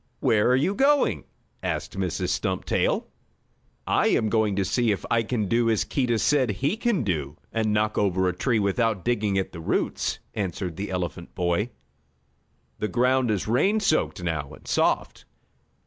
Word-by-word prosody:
"Where 105 +1 +3
are 125 - +5
you 155 +9 +1
going?" 280 +5 +2 0.4
asked - - -3
Mrs. - - -2
Stumptail. - - 0 0.8
"I - - +2
am 110 - +2
going 110 -2 +1
to 100 -1 0
see 120 +3 +1
if 100 - -3
I 115 -1 +4
can 110 -2 -1
do 115 +2 +2
as 110 -2 +2
Keedah 125 -4 0
said 130 +1 +2
he 135 - 0
could 225 - 0
do, 75 -6 -2 0.2
and 110 -1 +1
knock 105 +1 +1
over 95 -2 +2
a 90 - +1
tree 120 +4 +1
without 105 -1 0
digging 105 -5 +1
at 95 - -1
the 85 - -9
roots," - - -1 0.2
answered 90 -3 -3
the 100 +4 -4
elephant 90 -1 -4
boy. 90 +5 0 1.1
"The 105 - -1
ground 125 +1 +2
is 105 -2 -1
rain 190 - +2
soaked 155 - 0
now, 80 -5 -2
and - - -15
soft." - - 0
110 Hz, 165 wpm, -25 LUFS, 95-125 Hz, 1.1 s, are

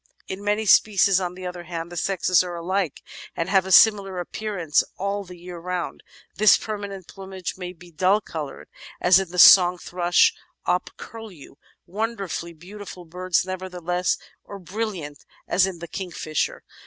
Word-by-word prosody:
In 190 +2 -6
many 210 +1 0
species, 200 -2 +5
on 180 -1 -4
the 185 0 -8
other 180 -1 -6
hand, 170 0 -6
the - - -8
sexes 185 0 +2
are 175 -1 -6
alike 175 -2 -2 0.3
and 165 +2 -2
have 190 -1 +3
a - - -4
similar 195 -2 +5
appear 210 +4 -5
ance 160 -4 +2
all 200 +1 -2
the 180 -1 -12
year 175 0 -9
round; 180 0 -4 0.4
this 215 +1 +6
permanent 200 -4 -6
plumage 190 -2 -7
may 180 -1 -6
be 175 0 -16
dull 185 +5 +2
coloured 155 -8 -7 0.3
as 180 +1 +6
in 190 -2 -4
the 180 - -8
Song 180 0 +8
Thrush 175 0 +2 0.3
op 180 +1 0
Curlew 215 -10 -11 0.2
— - - -54
^wonderfully 195 -4 -4
beautiful 185 +1 -10
birds, 180 +2 -1
nevertheless 180 -1 -2
— - - -36
or 200 - -9
brilliant 185 -6 -5 0.2
as 190 +1 +3
in 190 -2 -6
the 170 +1 -8
Kingfisher. 170 -5 -3
185 Hz, 165 wpm, -24 LUFS, 175-195 Hz, 0.4 s, Song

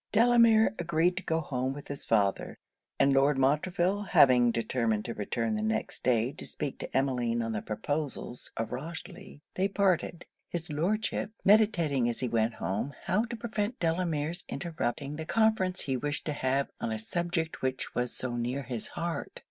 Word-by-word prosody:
Delamere 230 -1 +5
agreed 170 +1 +2
to 190 - -3
go 160 0 0
home 130 -2 -2
with 145 0 -9
his 140 - -6
father; 100 -3 +1 0.4
and 140 - +5
Lord 135 +1 +4
Montreville 175 +8 +2
having 125 -10 +5
determined 115 -2 0
to 115 - -3
return 115 +2 -2
the 105 - -1
next 110 0 -1
day 120 0 +2
to - - -9
speak 140 - -4
to - - -3
Emmeline 120 -3 +1
on 115 - -2
the 105 -2 -2
proposals 140 +2 -3
of 115 0 -2
Rochely, 145 +2 -7
they 190 +1 +1
parted; 190 -4 0 0.2
his 170 -2 -4
Lordship 200 +8 0 0.2
meditating 170 - +4
as 120 - -3
he 125 - 0
went 115 0 +1
home 105 +11 -3
how 195 +5 +1
to 235 0 -5
prevent 225 0 -3
Delamere's 165 0 -1
interrupting 150 -4 -3
the 160 - -5
conference 220 -5 +2
he 135 - -1
wished 145 +3 -3
to 150 - -1
have 135 0 0
on 115 - -1
a 110 - -1
subject 170 - -2
which 130 0 -2
was 125 0 -1
so 125 -2 -3
near 125 +4 -2
his 120 -3 -4
heart. 170 0 -4
145 Hz, 170 wpm, -30 LUFS, 120-175 Hz, 0.4 s, Delamere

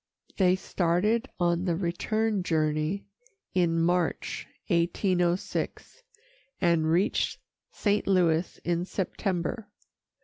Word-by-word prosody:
They 185 -2 +4
started 190 +7 0
on 175 0 +1
the 175 -3 +1
return 200 +4 0
journey 155 +2 0 0.5
in 170 -2 +2
March, 175 0 0 0.2
1806, 175 - 0 0.6
and 170 -3 +2
reached 185 +6 +1 0.3
St. 205 -1 0
Louis 175 -3 +2
in 175 0 0
September. 195 +2 -2
175 Hz, 90 wpm, -28 LUFS, 170-195 Hz, 0.6 s, They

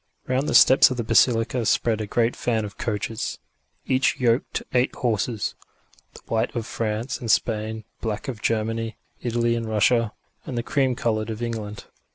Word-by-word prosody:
Round 130 +3 0
the - - +1
steps 130 - +8
of 130 - -3
the 120 - -1
basilica 115 +1 +3
spread 115 -1 +1
a 105 - -4
great 115 +3 +1
fan 110 -3 0
of 105 - -10
coaches, 115 +4 -3 0.5
each 130 0 +1
yoked 120 0 +1
to - - -2
eight 125 +1 +2
horses 115 -2 -1 0.6
the - - -12
white 110 +2 -1
of 115 -2 -2
France 115 +2 -3
and 115 - -5
Spain, 110 0 0 0.2
the - - -37
black 105 -1 -3
of 120 -6 -5
Germany, 115 0 -1 0.2
Italy 120 0 +1
and 115 -1 -3
Russia, 110 +1 +2 0.3
and 125 - -5
the 120 - -1
cream 130 -1 +1
coloured 110 -2 -1
of 110 +1 -4
England. 110 -3 -5
115 Hz, 180 wpm, -24 LUFS, 110-125 Hz, 0.6 s, steps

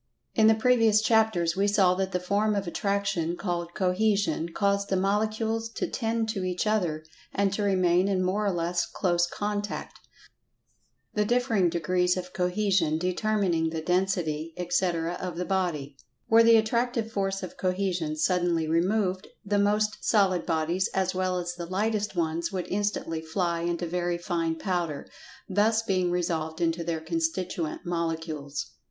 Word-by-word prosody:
In 220 -1 +5
the 220 - +6
previous 225 -2 +4
chapters 215 -6 +2
we 200 +1 +2
saw 195 -3 +4
that 190 +1 -2
the 180 - 0
form 205 +4 +1
of 200 -1 -1
Attraction 180 -2 -1
called 175 -2 -3
"Cohesion" 185 -3 +1
caused 200 +2 0
the 190 - +1
molecules 220 +3 0
to - - -2
tend 225 -1 -1
to 200 -4 -2
each 180 +1 -1
other, 175 -8 0 0.3
and 200 -1 +1
to 210 - -2
remain 185 -2 +3
in 190 -2 +1
more 190 +3 0
or 200 - +1
less 170 0 -1
close 175 -2 +1
contact, 205 +2 -4 1.1
the 210 - +2
differing 225 -5 +2
degrees 180 +2 +1
of 180 0 -6
Cohesion 180 -3 +1
determining 180 -2 0
the 160 0 -3
Density, 165 -3 -1
etc., 175 -1 0
of 180 -2 -4
the 180 - -2
body. 170 -8 -1 0.3
Were 225 +1 +6
the 230 0 +7
Attractive 230 +1 0
force 195 -2 -1
of 185 - -7
Cohesion 185 -4 -1
suddenly 175 -1 +1
removed, 185 +3 +1 0.2
the 205 0 +1
most 210 +1 +1
solid 195 -5 +2
bodies, 165 +3 +1
as 190 -1 +1
well 185 0 0
as 175 0 -3
the 175 -1 -7
lightest 210 +2 -1
ones, 165 +1 -1
would 185 -3 -3
instantly 195 -5 -1
fly 170 +1 -1
into 175 0 -1
very 175 0 -1
fine 170 -2 -1
powder, 170 -4 -2 0.4
thus 215 +3 +2
being 185 -4 +1
resolved 165 -2 -2
into 170 0 0
their 165 -1 -2
constituent 165 +1 -2
molecules. 160 -6 -3
185 Hz, 155 wpm, -27 LUFS, 170-205 Hz, 1.1 s, the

